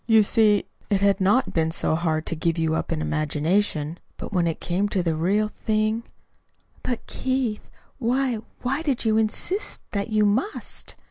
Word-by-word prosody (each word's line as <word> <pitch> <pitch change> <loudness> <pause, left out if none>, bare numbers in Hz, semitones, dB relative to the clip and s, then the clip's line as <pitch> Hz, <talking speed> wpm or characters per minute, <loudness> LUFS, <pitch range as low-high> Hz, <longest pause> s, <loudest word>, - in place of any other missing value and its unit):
You 220 -2 +6
see, 210 -1 +4 0.2
it 200 -1 +2
had 200 -1 +3
not 210 +8 +3
been 160 -1 +2
so 160 - 0
hard 160 -1 0
to - - -1
give 165 +1 0
you 160 -1 +1
up 160 - -2
in 155 -1 -1
imagination; 155 +1 0 0.2
but - - -7
when 175 -3 +2
it 165 - -2
came 190 +4 0
to 190 -3 0
the 165 -2 +1
real 195 +7 +2
thing 215 +1 0 0.4
" - - -36
"But, 245 -2 -3
Keith, 260 -5 -2 0.3
why 255 0 +1 0.3
why 270 +5 0
did 280 -7 -1
you 220 -1 +3
insist 280 - -1
that 200 0 -2
you 215 -1 +3
must?" 240 - -1
205 Hz, 180 wpm, -24 LUFS, 165-225 Hz, 0.4 s, You